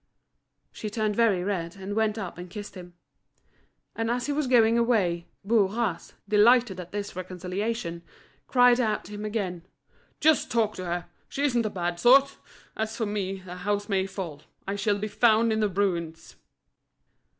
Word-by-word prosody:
She 215 - -6
turned 215 -1 -1
very 210 -6 +3
red, 180 -3 -3
and 195 +1 -6
went 220 0 +1
up 190 -4 -6
and 180 0 -8
kissed 205 +2 -8
him. 180 -2 -11 1.0
And 225 0 -1
as 245 +1 -1
he 290 - -1
was 295 -1 0
going 230 -2 +5
away, 205 -8 +1 0.2
Bourras, 210 -3 0
delighted 215 -1 +4
at 180 0 -8
this 205 -2 -5
reconciliation, 185 +1 -4 0.5
cried 245 -1 +5
out 220 -4 0
to - - -11
him 210 0 -6
again: 195 -6 -3 0.6
"Just 310 -1 +3
talk 220 -2 +1
to 185 - -5
her, 175 0 -3 0.2
she 280 - -3
isn't 240 -6 +2
a - - -2
bad 175 -3 -3
sort 270 +6 +5 0.4
As 220 0 -3
for 225 - 0
me, 195 -2 -3
the 180 -1 -9
house 205 +2 -1
may 190 -1 +1
fall, 180 -7 -6 0.3
I 195 - -1
shall 205 0 +1
be 210 +1 -3
found 225 0 +3
in 220 - 0
the 210 -1 +2
ruins." 170 -4 -2
205 Hz, 170 wpm, -27 LUFS, 185-225 Hz, 1.0 s, going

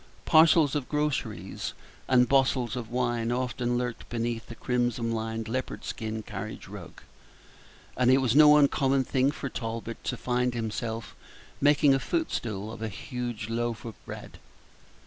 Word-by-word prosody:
Parcels 160 -2 +6
of 145 -4 -2
grocery 150 -1 -2 0.5
and 125 -1 +5
bottles 130 -2 +2
of 120 -3 -5
wine 120 -1 0
often 125 -1 -1
lurked 125 -1 -4
beneath 115 -1 -2
the 115 - -8
crimson 120 -2 0
lined 115 0 -3
leopard 130 +3 -4
skin 110 -1 -4
carriage - - -7
rug; - - -10 0.9
and 125 -1 +3
it 130 - +6
was 130 -2 +1
no 150 0 +8
uncommon 135 -2 +3
thing 130 +1 +2
for 145 -1 -4
Talbot 115 -2 -5
to 125 - -2
find 125 0 0
himself 115 0 -4 0.5
making 145 0 +5
a 135 - +2
footstool 110 - -2
of 115 - -9
a 110 - -2
huge 120 +1 -5
loaf 115 -1 -2
of 115 - -5
bread. - - -9
120 Hz, 145 wpm, -28 LUFS, 115-135 Hz, 0.9 s, no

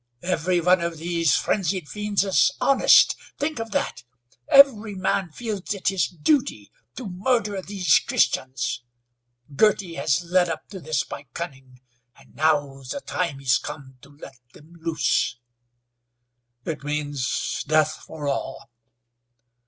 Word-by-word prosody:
Every 180 0 0
one 180 +1 +4
of 170 -1 -3
these 165 -1 +1
frenzied 185 -4 -1
fiends 210 +1 -1
is 195 +7 +3
honest. 275 - +5 0.2
Think 295 -3 -2
of 225 0 -4
that! - - -2 0.5
Every 225 -7 +6
man 185 -1 -1
feels 210 0 -4
it 190 - 0
his 190 -4 +1
duty 175 - 0 0.2
to 250 - -6
murder 200 +1 -1
these 190 -1 +2
Christians. 130 -2 0 0.7
Girty 200 -2 +2
has 160 0 0
led 175 0 +2
up 165 - -5
to 195 - -8
this 155 -1 -1
by 145 - -9
cunning, 130 -6 -8 0.3
and - - -21
now 145 -3 +1
the 135 - -6
time 170 - -3
is 125 -1 +3
come 135 -3 -9
to 140 - -16
let 140 -3 -13
them 155 +3 -17
loose." 160 -6 0 1.3
"It 155 -3 -4
means 145 -2 -2
death 155 0 +2
for 150 -2 -8
all." 135 -1 -4
170 Hz, 135 wpm, -24 LUFS, 145-195 Hz, 1.3 s, Every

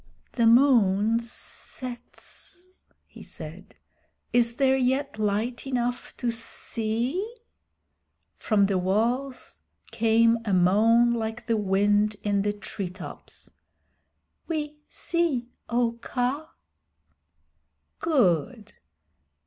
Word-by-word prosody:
"The 235 -2 +2
moon 230 -4 +5
sets," 255 +9 -9 0.2
he - - -14
said. - - -10 0.6
"Is 235 -1 +3
there 265 +1 +3
yet 265 -1 0
light 215 +5 -1
enough 245 -1 -2
to 240 -2 -1
see?" 230 - -2 1.1
From 205 -3 +2
the 195 -2 +1
walls 235 +8 -1 0.3
came 230 +1 +3
a 205 -3 -1
moan 225 +6 +4
like 225 0 -3
the 230 - +1
wind 205 +1 +2
in 205 -1 +1
the 205 +1 +1
tree 200 -2 -5
tops 185 0 -10 1.0
"We 300 -2 -3
see, 295 -9 -1 0.2
O 235 -1 0
Kaa." 265 +6 -2 1.5
"Good. 215 - +1
230 Hz, 90 wpm, -26 LUFS, 210-255 Hz, 1.5 s, moon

